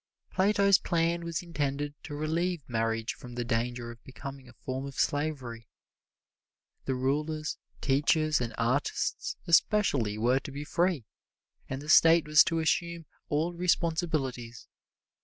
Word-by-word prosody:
Plato's 200 0 +4
plan 170 0 0
was 170 0 -3
intended 145 -3 -2
to 145 - -6
relieve 160 +1 -1
marriage 115 -1 -1
from 120 -1 -11
the 120 -1 -2
danger 120 0 -2
of 120 -1 -15
becoming 135 0 -9
a - - -15
form 130 +2 -5
of 135 - -9
slavery. 130 -7 -2 1.2
The 130 - 0
rulers, 150 +4 -1 0.2
teachers 155 +2 +2
and 115 -2 -2
artists 120 +5 -1
especially 155 - +3
were 125 +4 +2
to 140 - -9
be 140 +2 -5
free, 170 - 0 0.6
and 135 +2 -4
the - - -10
State 165 +1 +6
was 155 0 +7
to 165 - 0
assume 170 +1 0 0.2
all 160 +4 0
responsibilities. 160 -9 -1
145 Hz, 135 wpm, -29 LUFS, 125-165 Hz, 1.2 s, was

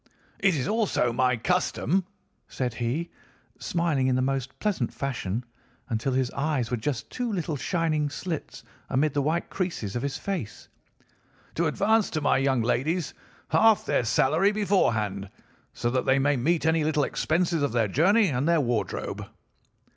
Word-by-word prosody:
"'It 195 -3 +3
is 130 -3 -1
also 210 - +1
my 125 0 +2
custom,' 180 +5 0 0.4
said 125 -3 -3
he, 125 +9 -2 0.5
smiling 165 -6 0
in 130 - +2
the 130 - +1
most 135 0 -2
pleasant 195 - -1
fashion 120 -5 -3 0.5
until 115 +3 -1
his 130 -1 0
eyes 140 -5 -1
were - - +2
just 120 0 -3
two 245 -2 -2
little 170 -6 -2
shining 155 0 0
slits 160 +1 -5 0.3
amid 140 +2 +1
the 145 - +1
white 160 +5 -1
creases 165 - -3
of 120 - -1
his 140 0 -2
face, 180 - -5 0.9
'to 170 0 +1
advance 210 +7 +2
to 155 - -2
my 145 - +2
young 135 -3 +2
ladies 150 +8 0 0.4
half 225 -2 +4
their - - +1
salary 155 - +3
beforehand, 110 - 0 0.4
so 120 - -2
that 130 0 -1
they 130 - +4
may 145 +1 +2
meet 155 +6 +1
any 160 -1 +3
little 150 -1 +1
expenses 170 +2 0
of 140 - +1
their 115 -2 +2
journey 195 - +4
and 135 +1 0
their 170 -1 +4
wardrobe. 120 -5 -2
145 Hz, 160 wpm, -26 LUFS, 125-170 Hz, 0.9 s, half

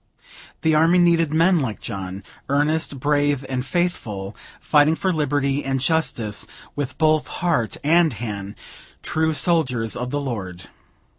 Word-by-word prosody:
The 160 - +3
army 165 +3 +4
needed 170 -3 +3
men 165 +3 +4
like 120 -7 -3
John, 95 -2 -6 0.3
earnest, 145 0 0
brave, 145 -1 +1
and 130 -1 -2
faithful; 115 - -2 0.2
fighting 150 +1 +3
for 185 +2 0
liberty 145 -2 0
and 135 0 -1
justice 130 -7 -1 0.3
with 145 -2 -4
both 155 -1 +2
heart 160 - -1
and 165 +2 +4
hand, 105 -3 -6 0.5
true 160 0 0
soldiers 130 - +1
of 125 0 -4
the 145 - -1
Lord. 95 -10 -5
145 Hz, 135 wpm, -22 LUFS, 120-160 Hz, 0.5 s, army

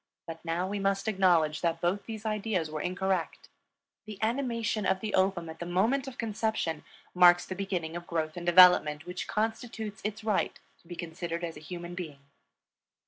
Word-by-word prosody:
But 165 -1 -8
now 170 +2 -1
we 200 +1 -3
must 195 +1 0
acknowledge 175 -7 +3
that 165 -1 0
both 180 +4 -1
these 220 -1 -7
ideas 210 -7 -1
were 155 -1 -3
incorrect. 185 -1 -2 0.6
The 210 -2 -7
animation 230 -2 0
of 190 - +1
the 215 +1 -4
ovum 190 -3 +2
at 160 0 -9
the 175 - -5
moment 225 +10 +1
of 265 - -8
conception 220 -8 -2 0.3
marks 175 -1 +6
the - - -5
beginning 180 -4 -3
of 175 0 -6
growth 160 -2 -2
and 175 - -6
development 175 -4 +6
which 180 0 -5
constitutes 220 -1 -3
its 215 +1 -4
right 215 -3 0 0.2
to - - -25
be 175 - -7
considered 170 0 -5
as 165 -1 -4
a - - -9
human 175 +2 -7
being. 165 -5 -6
180 Hz, 180 wpm, -29 LUFS, 170-210 Hz, 0.6 s, marks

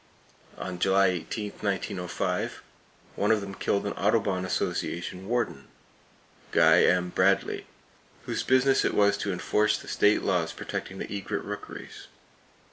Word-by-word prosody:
On 90 -1 -5
July 95 -2 +3
8, 105 -2 -5
1905, 95 -3 -2 0.5
one 105 - 0
of 110 -1 +4
them 100 -1 -7
killed 100 +1 -1
an 100 - -2
Audubon 100 -5 +1
Association 90 0 -3
Warden, 120 +1 -1 0.8
Guy - - +6
M. 90 0 +2
Bradley, - - +1 0.6
whose - - -2
business 130 +1 +3
it - - 0
was 100 -1 +4
to 100 - -2
enforce 105 +4 +1
the - - -12
state 105 +1 +3
laws 90 -4 0
protecting 95 - -5
the 100 - -5
egret 100 - -3
rookeries. - - -8
100 Hz, 130 wpm, -27 LUFS, 90-105 Hz, 0.8 s, Guy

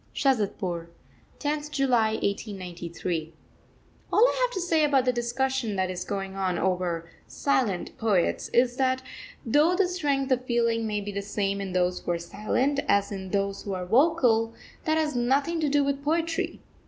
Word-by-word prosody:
SHAZADPUR, 195 - 0 0.5
10th 295 0 -2
July 245 -7 +2
1893. 175 -6 -3 0.8
All 460 +4 +6
I - - -1
have - - +2
to - - -1
say 330 -3 +2
about 275 -3 +3
the 250 - +2
discussion 240 -1 -1
that 185 -1 0
is 180 0 -4
going 195 -1 -4
on 185 -2 0
over 180 -2 -1 0.2
"silent 240 -10 0
poets" 205 -6 +1
is 245 0 +2
that, 260 -1 +1 0.4
though 300 +9 +4
the 385 0 +3
strength 285 -7 -1
of 255 0 +2
feeling 230 -2 +1
may 210 -1 -1
be 205 +1 -5
the 200 0 -3
same 200 0 -2
in 190 -2 -4
those 180 0 +1
who - - -8
are - - -1
silent 245 +11 -1
as 200 0 +2
in 190 -2 -5
those 200 0 -1
who 200 -2 -4
are 180 -1 -4
vocal, 235 - +3 0.3
that 315 -1 +2
has 310 -3 0
nothing 275 +7 +1
to 305 -2 +1
do 290 0 +3
with 280 0 -1
poetry. 330 +2 -1
230 Hz, 170 wpm, -27 LUFS, 195-280 Hz, 0.8 s, All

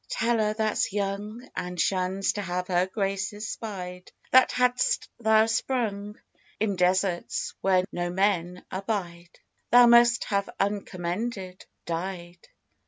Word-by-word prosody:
Tell 230 0 +1
her 215 0 +1
that's 215 0 0
young, 205 +4 -3
And 180 0 -4
shuns 190 +1 +1
to 205 - -3
have 180 -1 -3
her 180 0 +2
graces 195 +1 -3
spied, 180 -6 -7 0.2
That 260 0 +6
had'st 250 - +1
thou 220 -1 +4
sprung 220 -3 -2 0.4
In 205 -2 0
deserts 180 0 0
where 185 -1 +3
no 175 0 -2
men 180 -1 0
abide, 185 -3 -4 0.3
Thou 245 0 +8
must 235 0 +6
have 200 -1 -1
uncommended 195 0 -3 0.2
died. 175 0 -5
195 Hz, 120 wpm, -26 LUFS, 180-220 Hz, 0.4 s, Thou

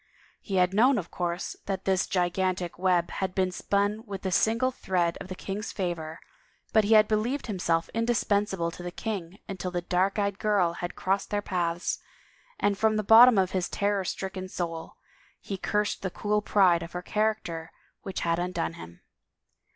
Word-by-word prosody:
He 195 - -4
had 180 0 +3
known, 245 +6 +5
of 180 -4 -4
course, 175 0 -3
that 195 -1 -3
this 190 -1 +2
gigantic 180 -1 -1
web 180 -2 +2
had 190 -1 -3
been 185 -1 +1
spun 205 +4 0
with 195 -2 -6
the 190 - -1
single 230 +7 +2
thread 175 -7 0
of - - -7
the 185 - -6
king's 200 +3 -5
favor, 170 -4 -4 0.5
but 220 - +5
he 215 +2 +4
had 215 0 +6
bejieved 230 +6 0
himself 170 -6 0
indispensable 205 -6 0
to 175 - -10
the 175 - -4
king 190 -2 -5
until 185 -1 -4
the 175 -1 -3
dark 185 +3 +1
eyed 200 -1 -1
girl 200 -6 +2
had 175 +1 -5
crossed 195 +1 -1
their 205 -1 -1
paths, 175 -3 -1 0.6
and 200 -1 +1
from 220 -1 +3
the 215 - 0
bot 225 +4 +9
tom 245 -4 +4
of 185 -1 +2
his 185 -2 -1
terror 200 -1 0
stricken 190 0 -4
soul 165 -3 -5 0.4
he 200 - -5
cursed 210 +2 -1
the 190 - -2
cool 210 +3 0
pride 185 -5 +4
of 170 - -8
her 180 0 -4
character 210 -7 -1 0.3
which 195 - -5
had 170 0 +1
imdone 175 - -2
him. 85 +1 -11
190 Hz, 180 wpm, -27 LUFS, 175-210 Hz, 0.6 s, bot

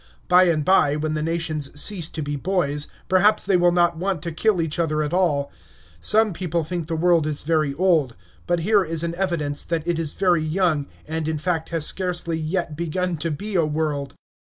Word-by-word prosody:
By 180 +1 +6
and 155 -4 +1
by, 150 -6 +4
when 155 +1 -2
the 155 - -2
nations 155 -3 -2
cease 175 -2 +1
to 155 - -5
be 145 0 -3
boys, 150 -3 -1 0.2
perhaps 205 +3 +3
they 195 -1 +2
will 175 0 +4
not 175 -1 +2
want 185 -2 -2
to 170 - -3
kill 195 +4 +1
each 160 0 -2
other 155 -2 0
at 150 +2 -4
all. 160 -6 +1 0.5
Some 215 - +2
people 170 -1 -2
think 165 0 -4
the 165 - -2
world 165 -1 +2
is 150 -1 -1
very 155 -3 0
old; 160 -8 +2 0.3
but 175 -1 +1
here 205 +3 +3
is 165 -1 -1
an 170 0 -2
evidence 170 -6 -2
that 165 -1 -3
it 170 -1 0
is 160 -3 -1
very 175 -4 +2
young, 155 -3 0 0.2
and, 160 0 -3
in 160 -1 -1
fact, 160 +1 -2
has 165 -3 +1
scarcely 175 -3 -1
yet 160 0 -2
begun 170 +2 -2
to 160 +2 -2
be 200 +8 -5
a 175 -3 +3
world. 150 -3 -2
165 Hz, 205 wpm, -22 LUFS, 155-180 Hz, 0.5 s, By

